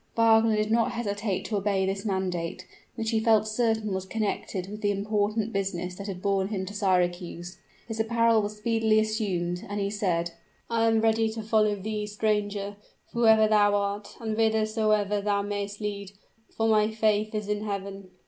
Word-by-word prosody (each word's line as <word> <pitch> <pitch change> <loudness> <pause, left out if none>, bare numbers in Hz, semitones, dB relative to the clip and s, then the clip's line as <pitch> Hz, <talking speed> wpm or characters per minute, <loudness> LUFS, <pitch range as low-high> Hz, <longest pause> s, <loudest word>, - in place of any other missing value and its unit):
Wagner 225 -1 +5
did 215 0 0
not 230 0 +2
hesitate 205 -4 -2
to 215 - -1
obey 195 -1 +1
this 195 +1 -3
mandate, 180 -3 -2 0.3
which 225 0 -2
he 225 - +2
felt 220 -1 +3
certain 220 -2 0
was 190 0 -2
connected 200 -3 -3
with 210 +2 -8
the 205 - +1
important 210 +2 0
business 190 -2 -2
that 200 +2 -8
had 185 -2 -6
borne 195 -1 +1
him 195 -2 -3
to 200 - -8
Syracuse. 180 -3 -1 0.3
His 225 -1 -5
apparel 230 0 +3
was 210 +1 -4
speedily 220 0 +2
assumed; 190 -5 -1
and 205 0 -3
he 200 0 -1
said, 175 -5 -1 0.4
"I 230 0 +2
am 225 -1 +3
ready 225 0 +2
to 220 0 -5
follow 215 -1 +2
thee, 210 +1 -4
stranger, 205 -1 -1 0.4
whoever 220 -2 +5
thou 205 -1 +4
art, 200 0 -2
and 220 -2 -3
whithersoever 215 -2 +1
thou 200 0 0
mayst 205 0 -4
lead; 200 -2 -5 0.4
for 225 - +2
my 215 -1 +4
faith 215 -1 +1
is 210 -1 -3
in 210 0 -1
Heaven." 200 -2 -5
210 Hz, 175 wpm, -27 LUFS, 200-220 Hz, 0.4 s, Wagner